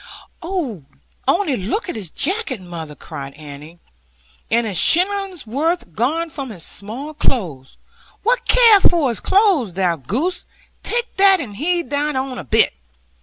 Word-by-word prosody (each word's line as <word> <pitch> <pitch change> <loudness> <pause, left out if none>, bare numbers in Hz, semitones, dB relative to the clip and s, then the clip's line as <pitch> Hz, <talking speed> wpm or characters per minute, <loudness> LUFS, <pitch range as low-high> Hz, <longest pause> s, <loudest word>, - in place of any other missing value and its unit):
'Only 290 - -3
look 225 - -3
at 350 - -4
his 200 -6 -5
jacket, 340 - -1
mother!' 165 -4 -8
cried 135 0 -9
Annie; 150 +2 -11 0.7
'and 235 +1 +2
a 210 - -3
shillingsworth 340 - +1
gone 315 - -1
from 270 -2 -5
his 185 -7 -6
small 245 +10 -4
clothes!' 170 - -2 0.5
'What - - +1
care 465 -4 +7
I - - +1
for 335 -7 +3
his 230 - -3
clothes, 375 - +2
thou 180 -3 +1
goose? 250 - -2 0.3
Take 475 0 -2
that, 390 -1 +6
and 225 -10 -6
heed 340 - -1
thine 290 0 0
own 260 -1 -3
a - - -6
bit.' 130 - +3
270 Hz, 145 wpm, -19 LUFS, -, 0.7 s, care